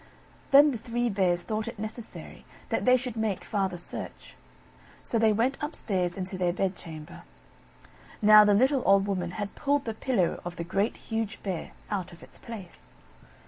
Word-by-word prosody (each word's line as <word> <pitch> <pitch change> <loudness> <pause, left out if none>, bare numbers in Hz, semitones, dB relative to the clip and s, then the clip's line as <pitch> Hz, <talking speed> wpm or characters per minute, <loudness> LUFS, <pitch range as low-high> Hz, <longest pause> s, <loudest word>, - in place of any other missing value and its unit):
Then 285 +1 +7
the 240 - -4
Three 240 +1 -1
Bears 180 -4 +1
thought 215 +2 -3
it - - -6
necessary 220 +2 -7 0.3
that - - -1
they 255 0 +6
should 250 -2 -5
make 220 -4 -1
farther 195 -3 -1
search; 175 - -6 0.7
so 230 - 0
they 220 -1 +5
went 235 +6 +1
upstairs 190 - -2
into 185 0 -4
their 180 -1 +2
bedchamber. 175 -4 -5 1.0
Now 215 0 +8
the 205 -1 +4
little 260 +4 +3
old 195 0 +5
Woman 185 -3 -2
had 205 -1 -4
pulled 285 0 0
the 225 - -2
pillow 220 -6 0
of 175 0 -6
the 170 - -4
Great, 195 +5 -1
Huge 225 -2 -4
Bear, 185 -4 -4 0.2
out 195 -4 -2
of 170 - -14
its - - -15
place. 210 -7 -10
210 Hz, 170 wpm, -28 LUFS, 185-230 Hz, 1.0 s, Now